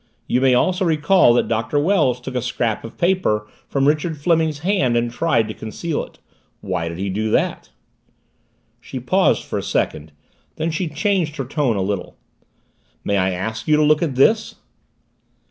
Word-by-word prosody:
You 125 Hz, -, 0 dB
may 130 Hz, -1 st, +4 dB
also 185 Hz, +8 st, +1 dB
recall 160 Hz, -2 st, +4 dB
that -, -, +2 dB
Doctor 115 Hz, +5 st, -1 dB
Wells 145 Hz, -6 st, +2 dB
took 130 Hz, +1 st, -7 dB
a 125 Hz, -, -1 dB
scrap 120 Hz, -2 st, -2 dB
of 115 Hz, -, -10 dB
paper 170 Hz, -, +1 dB, 0.2 s
from 140 Hz, 0 st, +1 dB
Richard 155 Hz, +2 st, 0 dB
Fleming's 160 Hz, 0 st, +1 dB
hand 160 Hz, -12 st, +2 dB
and 120 Hz, 0 st, 0 dB
tried 120 Hz, -4 st, +1 dB
to 110 Hz, -, -5 dB
conceal 145 Hz, +10 st, -4 dB
it -, -, -14 dB, 0.4 s
why 90 Hz, -3 st, -3 dB
did 85 Hz, 0 st, -6 dB
he 95 Hz, +2 st, -3 dB
do 105 Hz, +3 st, -1 dB
that?" 105 Hz, -, 0 dB, 1.1 s
She 130 Hz, +2 st, -7 dB
paused 185 Hz, +10 st, +2 dB
for -, -, -3 dB
a -, -, -3 dB
second. 80 Hz, 0 st, -2 dB, 0.4 s
Then 165 Hz, +1 st, -2 dB
she 170 Hz, +3 st, -2 dB
changed 165 Hz, 0 st, -1 dB
her 135 Hz, -3 st, -4 dB
tone 135 Hz, -3 st, 0 dB
a 95 Hz, -, 0 dB
little. 100 Hz, -1 st, -4 dB, 0.9 s
"May 100 Hz, -, 0 dB
I 95 Hz, 0 st, +2 dB
ask 110 Hz, +5 st, -4 dB
you 150 Hz, -1 st, +4 dB
to 155 Hz, -, +3 dB
look 150 Hz, 0 st, +3 dB
at 155 Hz, -6 st, -1 dB
this?" 215 Hz, -, +3 dB
135 Hz, 180 wpm, -20 LUFS, 110-160 Hz, 1.1 s, may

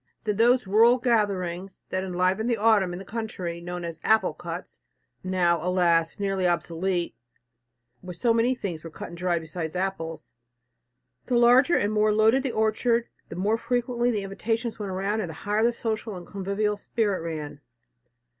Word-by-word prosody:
Then 210 Hz, -2 st, -1 dB
those 240 Hz, +2 st, +4 dB
rural 225 Hz, +5 st, +5 dB
gatherings 195 Hz, -6 st, -1 dB
that 185 Hz, 0 st, -2 dB
enlivened 185 Hz, +4 st, 0 dB
the 235 Hz, -, +1 dB
autumn 210 Hz, -4 st, +3 dB
in 175 Hz, -, -5 dB
the 195 Hz, -, -9 dB
country, 185 Hz, -6 st, -5 dB
known 175 Hz, 0 st, -5 dB
as 165 Hz, -1 st, -6 dB
"apple 220 Hz, -7 st, +3 dB
cuts," 170 Hz, +2 st, -8 dB, 0.4 s
now, 175 Hz, -3 st, +1 dB
alas! 175 Hz, -2 st, +2 dB
nearly 195 Hz, -2 st, 0 dB
obsolete, 175 Hz, +1 st, -1 dB, 0.9 s
where 180 Hz, -1 st, -8 dB
so 230 Hz, +7 st, +2 dB
many 235 Hz, +3 st, +2 dB
things 175 Hz, -9 st, -5 dB
were 165 Hz, -, -7 dB
cut -, -, -8 dB
and 170 Hz, -, -10 dB
dried 175 Hz, -2 st, 0 dB
besides 160 Hz, +1 st, -5 dB
apples! 180 Hz, -4 st, -4 dB, 0.9 s
The 245 Hz, -, +1 dB
larger 245 Hz, +7 st, +5 dB
and 205 Hz, +1 st, 0 dB
more 215 Hz, 0 st, +3 dB
loaded 220 Hz, +5 st, +4 dB
the 265 Hz, -2 st, -2 dB
orchard, 230 Hz, +2 st, +1 dB, 0.2 s
the -, -, -7 dB
more 210 Hz, +5 st, 0 dB
frequently 240 Hz, 0 st, 0 dB
the 210 Hz, -4 st, -1 dB
invitations 225 Hz, +4 st, -3 dB
went 200 Hz, -2 st, -4 dB
round 200 Hz, +4 st, -1 dB
and 180 Hz, -, -4 dB
the 160 Hz, -, -8 dB
higher 210 Hz, +4 st, -1 dB
the 235 Hz, -, +4 dB
social 220 Hz, -2 st, -3 dB
and 175 Hz, -1 st, -8 dB
convivial 200 Hz, +2 st, -2 dB
spirit 205 Hz, -2 st, -1 dB
ran. 150 Hz, -3 st, -6 dB
195 Hz, 170 wpm, -26 LUFS, 175-225 Hz, 0.9 s, rural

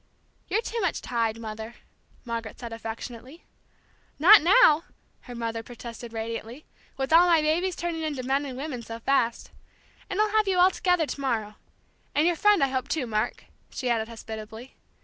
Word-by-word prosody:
"You're 445 Hz, +3 st, 0 dB
too 460 Hz, 0 st, -3 dB
much 370 Hz, -5 st, -1 dB
tied, 230 Hz, -2 st, -1 dB
Mother," 220 Hz, +1 st, -7 dB, 0.5 s
Margaret 230 Hz, -2 st, -5 dB
said 235 Hz, -2 st, -7 dB
affectionately. 230 Hz, +6 st, -8 dB, 0.7 s
"Not 390 Hz, +8 st, +8 dB
now!" 335 Hz, -3 st, +5 dB, 0.4 s
her 245 Hz, -, -9 dB
mother 230 Hz, -1 st, -3 dB
protested 235 Hz, 0 st, -9 dB
radiantly. 230 Hz, +4 st, -6 dB, 0.3 s
"With 270 Hz, +3 st, -1 dB
all 345 Hz, +2 st, +7 dB
my 335 Hz, -2 st, +5 dB
babies 335 Hz, +4 st, +1 dB
turning 340 Hz, -2 st, -3 dB
into 295 Hz, -5 st, -3 dB
men 270 Hz, +3 st, +1 dB
and 255 Hz, -2 st, -7 dB
women 270 Hz, -3 st, -5 dB
so 230 Hz, 0 st, -8 dB
fast. 235 Hz, -1 st, 0 dB, 0.6 s
And 390 Hz, 0 st, -3 dB
I'll 425 Hz, 0 st, +3 dB
have 430 Hz, -1 st, +2 dB
you 375 Hz, -1 st, +1 dB
all 365 Hz, +1 st, +6 dB
together 360 Hz, -3 st, +1 dB
to 285 Hz, -, -6 dB
morrow 220 Hz, -6 st, -2 dB, 0.6 s
and 300 Hz, -, +3 dB
your 350 Hz, 0 st, +3 dB
friend 415 Hz, 0 st, +4 dB
I 275 Hz, -, +2 dB
hope, 260 Hz, -1 st, -2 dB
too, 300 Hz, -5 st, -1 dB
Mark," 215 Hz, -2 st, -2 dB, 0.2 s
she 250 Hz, -2 st, -2 dB
added 220 Hz, -1 st, 0 dB
hospitably. 225 Hz, +1 st, -9 dB
260 Hz, 170 wpm, -26 LUFS, 230-335 Hz, 0.7 s, Not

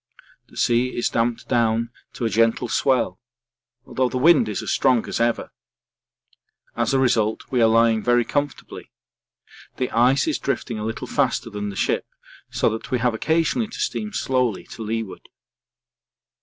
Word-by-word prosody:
The -, -, -17 dB
sea 120 Hz, +1 st, +1 dB
is 120 Hz, -, +1 dB
damped 115 Hz, 0 st, -1 dB
down 115 Hz, -1 st, +1 dB, 0.2 s
to 120 Hz, -, -4 dB
a -, -, +1 dB
gentle 115 Hz, +3 st, +2 dB
swell, 130 Hz, +2 st, +1 dB, 0.7 s
although 130 Hz, -2 st, 0 dB
the 130 Hz, -, -3 dB
wind 155 Hz, -1 st, +5 dB
is 105 Hz, -, -3 dB
as -, -, -2 dB
strong 125 Hz, -4 st, +2 dB
as -, -, -3 dB
ever. 115 Hz, 0 st, 0 dB, 1.2 s
As 120 Hz, -1 st, 0 dB
a 135 Hz, -, +2 dB
result 115 Hz, -4 st, +1 dB
we 125 Hz, -2 st, +2 dB
are 115 Hz, -, +6 dB
lying 115 Hz, 0 st, +3 dB
very 120 Hz, +1 st, +2 dB
comfortably. 145 Hz, +1 st, -4 dB, 0.9 s
The 125 Hz, -, -2 dB
ice 125 Hz, -, +3 dB
is 315 Hz, -, 0 dB
drifting 120 Hz, -4 st, -3 dB
a -, -, -4 dB
little 110 Hz, +2 st, -4 dB
faster 125 Hz, -3 st, -1 dB
than 105 Hz, 0 st, -4 dB
the 100 Hz, -, -7 dB
ship -, -, 0 dB, 0.4 s
so -, -, 0 dB
that 110 Hz, +3 st, -6 dB
we 130 Hz, -, +1 dB
have 120 Hz, 0 st, +1 dB
occasionally 165 Hz, -, 0 dB
to 220 Hz, -, -10 dB
steam 215 Hz, 0 st, -2 dB
slowly 125 Hz, -, 0 dB
to -, -, -9 dB
leeward. 110 Hz, -2 st, -5 dB
120 Hz, 165 wpm, -22 LUFS, 115-130 Hz, 1.2 s, are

